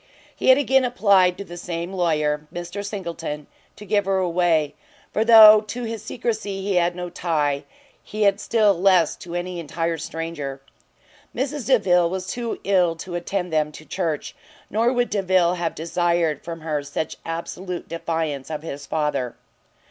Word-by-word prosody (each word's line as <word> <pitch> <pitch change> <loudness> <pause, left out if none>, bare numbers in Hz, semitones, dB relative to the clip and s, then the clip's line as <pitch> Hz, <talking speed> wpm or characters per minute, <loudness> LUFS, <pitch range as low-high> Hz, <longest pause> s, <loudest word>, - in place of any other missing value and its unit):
He - - -3
had 260 - +8
again 265 -1 +3
applied 200 -7 +3
to - - -5
the 175 -2 -10
same 170 +1 -5
lawyer, 150 -4 0
Mr 175 +3 -6
Singleton, 170 -7 -5 0.3
to 210 - -11
give 205 -1 +1
her 195 0 +1
away; 170 -4 +1 0.4
for 215 - +2
though 215 -2 +9
to 240 +4 -5
his 225 -2 -5
secrecy 215 -4 -3
he 195 -2 0
had 175 0 +2
no 180 -1 -5
tie, 150 -5 -1 0.4
he 215 0 -3
had 200 0 +3
still 215 -3 +3
less 180 -3 +3
to 175 0 -8
any 175 0 -3
entire 165 +1 -2
stranger. 160 -5 -5 0.8
Mrs 275 0 -3
Delvile 180 -9 +4
was 185 +1 -4
too 235 +3 -4
ill 180 -4 +2
to 175 +2 -8
attend 175 0 -3
them 150 -1 +1
to 155 - -11
church, 165 -5 -3 0.4
nor 230 +4 +2
would 245 -1 0
Delvile 185 -3 +2
have 170 -2 -2
desired 170 -2 0
from 165 -1 -7
her 155 -2 -2
such 145 +2 -4
absolute 175 +2 -5
defiance 160 -4 -3
of 155 -1 -5
his 140 -3 -7
father. 150 -5 -1
175 Hz, 165 wpm, -23 LUFS, 165-200 Hz, 0.8 s, though